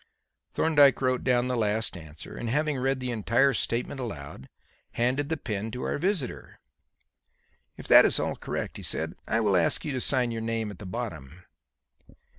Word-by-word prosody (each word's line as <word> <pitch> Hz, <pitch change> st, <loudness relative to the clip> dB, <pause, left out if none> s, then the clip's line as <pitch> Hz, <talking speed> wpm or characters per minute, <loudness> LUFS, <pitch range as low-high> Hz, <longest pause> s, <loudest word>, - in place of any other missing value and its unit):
Thorndyke 145 Hz, -4 st, +4 dB
wrote 130 Hz, -1 st, 0 dB
down 125 Hz, -1 st, +2 dB
the 125 Hz, -, -1 dB
last 110 Hz, -1 st, -1 dB
answer, 80 Hz, -2 st, -10 dB
and, 120 Hz, -, -4 dB
having 150 Hz, +2 st, 0 dB
read 135 Hz, +1 st, 0 dB
the 125 Hz, -1 st, -3 dB
entire 120 Hz, +5 st, +2 dB
statement 120 Hz, +4 st, -2 dB
aloud, 70 Hz, -, -7 dB, 0.4 s
handed 130 Hz, +5 st, 0 dB
the 160 Hz, -, -1 dB
pen 105 Hz, -4 st, -4 dB
to 125 Hz, +3 st, -6 dB
our -, -, -2 dB
visitor. 180 Hz, -7 st, -3 dB, 1.2 s
"If -, -, -10 dB
that -, -, +9 dB
is -, -, +5 dB
all -, -, -1 dB
correct," -, -, -5 dB
he -, -, -9 dB
said, -, -, 0 dB
"I 115 Hz, -, +1 dB
will 105 Hz, -3 st, +2 dB
ask 85 Hz, -, +2 dB
you 150 Hz, -, -2 dB
to 130 Hz, -2 st, -2 dB
sign 125 Hz, -3 st, +2 dB
your 115 Hz, -1 st, -4 dB
name 115 Hz, -1 st, -2 dB
at 95 Hz, -, -12 dB
the 100 Hz, -, -8 dB
bottom." 85 Hz, -2 st, -6 dB
120 Hz, 180 wpm, -27 LUFS, 105-135 Hz, 1.2 s, that